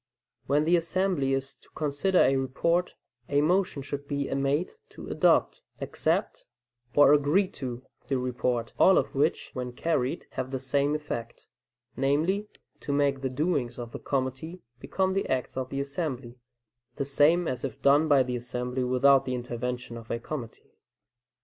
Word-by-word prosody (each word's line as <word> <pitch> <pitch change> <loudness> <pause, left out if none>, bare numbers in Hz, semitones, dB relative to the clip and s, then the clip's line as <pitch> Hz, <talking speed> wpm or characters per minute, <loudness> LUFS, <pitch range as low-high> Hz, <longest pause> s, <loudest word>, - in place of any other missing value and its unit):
When 145 +2 +2
the 170 +2 +4
assembly 170 -4 0
is 135 0 -2
to - - -25
consider 150 +5 0
a 135 - +4
report, 150 +7 0 0.3
a 145 - +3
motion 175 -3 +1
should 145 0 -6
be 140 -1 -2
made 140 +5 0 0.2
to - - -11
"adopt," - - +2 0.2
"accept," - - -1 0.5
or 145 0 +7
"agree 150 +7 +3
to" 125 -1 -6 0.2
the 135 - 0
report, 125 -2 -2
all 190 - +6
of - - 0
which, 145 +3 0
when 125 -1 -5
carried, 140 +1 -1
have 130 - -4
the 135 - -2
same 140 +3 0
effect, 120 -6 -6 0.5
namely, 160 +10 +1 0.3
to - - -5
make 140 -1 +1
the 135 - -1
doings 130 -3 -1
of 120 -1 -6
the - - -7
committee 135 +6 -3 0.2
become 190 +7 -1
the 195 - -1
acts 130 -1 -1
of 130 -1 -3
the 135 - -3
assembly, 140 -4 -4 0.6
the 140 - -2
same 150 +5 +3
as 125 -1 -3
if 130 -5 -4
done 145 +3 +4
by 140 -3 +5
the 125 0 -3
assembly 125 +1 -3
without 135 +2 +4
the 130 - -2
intervention 125 0 -4
of 115 -1 -11
a - - -1
committee. 120 -1 -7
140 Hz, 160 wpm, -28 LUFS, 125-155 Hz, 0.6 s, or